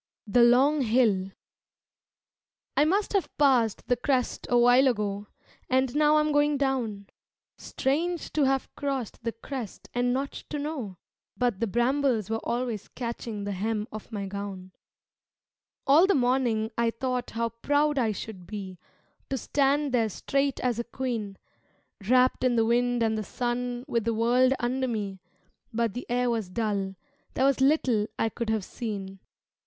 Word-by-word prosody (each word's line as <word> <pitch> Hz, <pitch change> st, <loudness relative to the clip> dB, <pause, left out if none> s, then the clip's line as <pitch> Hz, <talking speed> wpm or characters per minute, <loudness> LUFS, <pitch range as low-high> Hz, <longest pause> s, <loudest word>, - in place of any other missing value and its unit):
The 230 Hz, +3 st, +3 dB
Long 265 Hz, +5 st, +5 dB
Hill 220 Hz, -6 st, +2 dB, 1.5 s
I 295 Hz, -, +4 dB
must 395 Hz, +7 st, +1 dB
have 395 Hz, -3 st, +1 dB
passed 255 Hz, -7 st, +3 dB
the 245 Hz, -, +3 dB
crest 250 Hz, +1 st, -1 dB
a 245 Hz, -, +4 dB
while 245 Hz, +3 st, +6 dB
ago 205 Hz, -4 st, -1 dB, 0.4 s
And 260 Hz, 0 st, +1 dB
now 300 Hz, 0 st, +4 dB
I 305 Hz, -, +5 dB
am 305 Hz, 0 st, 0 dB
going 290 Hz, 0 st, +3 dB
down 245 Hz, -7 st, -1 dB, 0.5 s
Strange 330 Hz, +6 st, -2 dB
to 300 Hz, -3 st, +3 dB
have 270 Hz, 0 st, 0 dB
crossed 270 Hz, -6 st, -3 dB
the 230 Hz, -, -1 dB
crest 230 Hz, 0 st, -7 dB
and 245 Hz, 0 st, +1 dB
not 270 Hz, +2 st, -1 dB, 0.2 s
to 300 Hz, -, -3 dB
know, 285 Hz, -, -4 dB, 0.4 s
But 240 Hz, -6 st, 0 dB
the 230 Hz, -, 0 dB
brambles 240 Hz, -1 st, +1 dB
were 225 Hz, -, 0 dB
always 235 Hz, -4 st, -2 dB
catching 230 Hz, -3 st, -5 dB
the 200 Hz, -, -3 dB
hem 210 Hz, +2 st, -2 dB
of 215 Hz, +2 st, -9 dB
my 205 Hz, -2 st, -3 dB
gown. 195 Hz, -1 st, -6 dB, 1.1 s
All 305 Hz, +7 st, +6 dB
the 400 Hz, -, +3 dB
morning 245 Hz, -4 st, +1 dB
I 235 Hz, 0 st, +3 dB
thought 250 Hz, +1 st, -3 dB
how 230 Hz, 0 st, +1 dB
proud 290 Hz, +5 st, +1 dB
I 225 Hz, -3 st, +2 dB
should 195 Hz, -3 st, -7 dB
be 195 Hz, -4 st, -7 dB, 0.5 s
To 270 Hz, -, -1 dB
stand 280 Hz, +3 st, +1 dB
there 230 Hz, -3 st, +2 dB
straight 275 Hz, +6 st, -1 dB
as 245 Hz, -2 st, 0 dB
a -, -, 0 dB
queen, 230 Hz, -5 st, -4 dB, 0.7 s
Wrapped 255 Hz, 0 st, +4 dB
in 250 Hz, -1 st, +3 dB
the 225 Hz, -1 st, +3 dB
wind 245 Hz, +1 st, +2 dB
and 220 Hz, -1 st, +1 dB
the -, -, -3 dB
sun 245 Hz, +2 st, -3 dB
with 235 Hz, -5 st, -1 dB
the 230 Hz, -1 st, 0 dB
world 245 Hz, +3 st, +3 dB
under 255 Hz, +2 st, 0 dB
me 205 Hz, -5 st, -3 dB, 0.5 s
But 230 Hz, -2 st, 0 dB
the 245 Hz, -, -6 dB
air 245 Hz, 0 st, +1 dB
was 220 Hz, -5 st, -2 dB
dull, 200 Hz, -2 st, -2 dB, 0.4 s
there 265 Hz, -, +2 dB
was 275 Hz, -1 st, +2 dB
little 260 Hz, -7 st, +3 dB
I 225 Hz, -, +1 dB
could 230 Hz, +1 st, -4 dB
have 220 Hz, -3 st, 0 dB
seen. 195 Hz, -4 st, -6 dB
240 Hz, 160 wpm, -27 LUFS, 220-265 Hz, 1.5 s, while